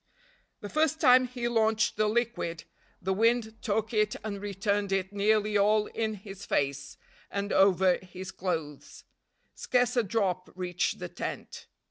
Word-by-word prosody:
The 205 - -6
first 315 +3 +1
time 255 -3 +6
he 245 -1 -3
launched 220 -2 +2
the 215 0 +2
liquid, 220 -8 -1 0.4
the 190 +2 -1
wind 225 +1 +1
took 220 +1 -1
it 215 -1 +2
and 200 -2 -5
returned 200 0 -1
it 195 0 -1
nearly 210 +1 +2
all 210 +1 +3
in 220 -1 -3
his 195 0 -10
face, 140 -5 -2 0.3
and 200 0 -3
over 190 -1 +4
his 185 0 -9
clothes. 160 -6 -5 0.5
Scarce 250 -1 +1
a 245 - +4
drop 190 -4 -1
reached 180 -1 -1
the - - -5
tent. - - -6
205 Hz, 145 wpm, -29 LUFS, 190-225 Hz, 0.5 s, time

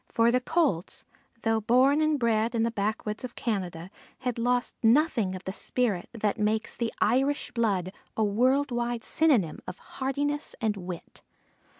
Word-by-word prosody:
For 230 +1 +3
the 250 +1 +2
Colts, 270 - 0 0.4
though 225 -1 +2
born 260 +7 +4
and 310 -1 +2
bred 230 -1 +1
in 225 - +2
the 230 - +1
backwoods 210 +1 -2
of 250 -1 -6
Canada, 185 -5 -3 0.3
had 250 -2 -2
lost 245 +1 +1
nothing 230 - +3
of 185 - -8
the 190 - -4
spirit 215 -2 -1
that 215 -2 -1
makes 215 +1 0
the 235 -1 -2
Irish 265 +4 +1
blood 200 -6 0 0.2
a 220 - +3
world 255 +7 +2
wide 240 -1 -2
synonym 250 - +2
of 180 - -6
heartiness 285 +3 -3
and 220 -3 0
wit. 180 -3 -8
230 Hz, 160 wpm, -28 LUFS, 210-255 Hz, 0.4 s, born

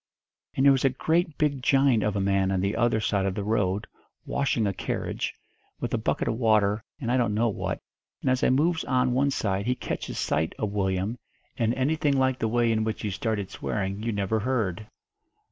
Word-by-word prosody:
"And 135 - +2
there 140 - +8
was 135 -1 +2
a 135 - +5
great 160 +4 0
big 145 -4 +1
giant 135 -3 +4
of 105 -1 0
a - - 0
man 95 -1 +2
on 95 -1 0
the 100 +2 0
other 120 -2 +2
side 100 -2 0
of 95 - -2
the 105 - -2
road, 100 -2 0 0.4
washing 135 -5 0
a 100 - 0
carriage, 95 - -3 0.4
with - - -3
a - - +1
bucket - - -1
of 115 - -1
water 110 -2 +3 0.2
and 120 -5 -2
I 130 - +3
don't 115 -4 +1
know 115 +2 +2
what, 105 - -3 0.4
and 130 - +2
as 130 - +1
I - - +4
moves 160 +6 +2
on 125 -1 +2
one 140 +3 +2
side 100 -5 -1
he 125 - +2
catches - - -4
sight 80 +1 0
of 105 -2 -2
Willyum, 100 +3 -1 0.4
and 115 -1 +1
anything 145 +1 +1
like 130 -1 +2
the 110 - +1
way 120 +1 +2
in 110 -1 +1
which 110 0 -3
he 105 - -1
started 105 -1 -2
swearing 100 0 -3
you 115 +1 -1
never 100 +1 0
heard. 110 -4 -1
110 Hz, 215 wpm, -26 LUFS, 100-130 Hz, 0.4 s, there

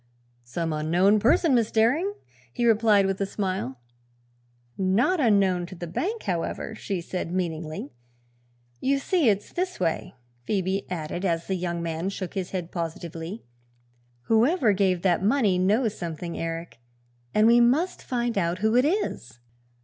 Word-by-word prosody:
"Some 160 +6 -3
unknown 175 +7 +3
person, 270 - +3
Miss 230 -3 +3
Daring," 290 - +2 0.4
he 240 - -1
replied 215 -3 +4
with 195 0 -1
a 195 - 0
smile. 185 - -3 1.0
"Not 205 - +2
unknown 195 -8 +3
to 185 - -10
the 175 - -6
bank, 385 - -3
however," 175 +4 -3
she 200 -4 -4
said 175 0 -4
meaningly. 160 -5 -3 0.9
"You 275 +1 +1
see, 295 -1 +2
it's 205 -1 -1
this 365 +1 -2
way," 165 -3 -2 0.3
Phoebe 195 +2 -1
added, 175 0 -4
as 170 -3 0
the 190 - -2
young 175 -2 -2
man 165 +2 -2
shook 190 -2 -5
his 190 -3 -3
head 180 -3 -4
positively, 170 +3 -5 0.8
"whoever 230 - +3
gave 185 -3 +1
that 180 -3 +2
money 210 -5 +3
knows 215 +4 +2
something, 170 0 -5
Eric, 165 -4 -5 0.6
and 215 - +5
we 235 +1 +6
must 285 +10 +2
find 240 -4 -1
out 170 0 0
who 220 +3 +1
it 250 +2 +5
is. 300 - -2
195 Hz, 150 wpm, -26 LUFS, 170-230 Hz, 1.0 s, we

